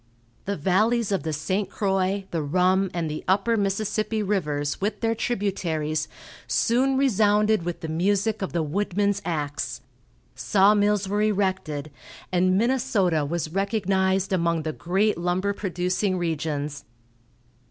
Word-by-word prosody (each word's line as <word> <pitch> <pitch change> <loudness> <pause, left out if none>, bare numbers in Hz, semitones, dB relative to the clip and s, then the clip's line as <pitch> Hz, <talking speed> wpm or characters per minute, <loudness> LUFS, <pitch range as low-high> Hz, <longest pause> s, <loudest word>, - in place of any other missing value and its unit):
The 200 0 -2
valleys 210 +7 +2
of 195 - +1
the 160 +2 -3
St. 185 +6 -1
Croix, 195 -1 0
the 165 - -1
Rum, 185 +5 +2
and 170 -2 -2
the 155 0 -5
Upper 200 +5 +2
Mississippi 215 +1 -1
rivers, 150 -8 -1
with 205 +1 -1
their 225 -1 +1
tributaries, 170 -9 -1 0.4
soon 260 +3 +2
resounded 215 -5 +3
with 175 0 -5
the 160 - -4
music 200 +7 0
of 190 - -3
the 170 -2 0
woodman's 200 +4 0
axe. 145 -3 -3 0.5
Saw 200 0 +4
mills 205 -1 +2
were 205 +2 0
erected, 190 -8 -1 0.4
and 185 +1 +3
Minnesota 220 - +1
was 155 +1 -3
recognized 195 -1 +1
among 170 -3 +1
the 155 0 -3
great 190 +4 0
lumber 180 +3 0
producing 185 0 -1
regions. 150 -4 -3
190 Hz, 130 wpm, -25 LUFS, 170-205 Hz, 0.5 s, Saw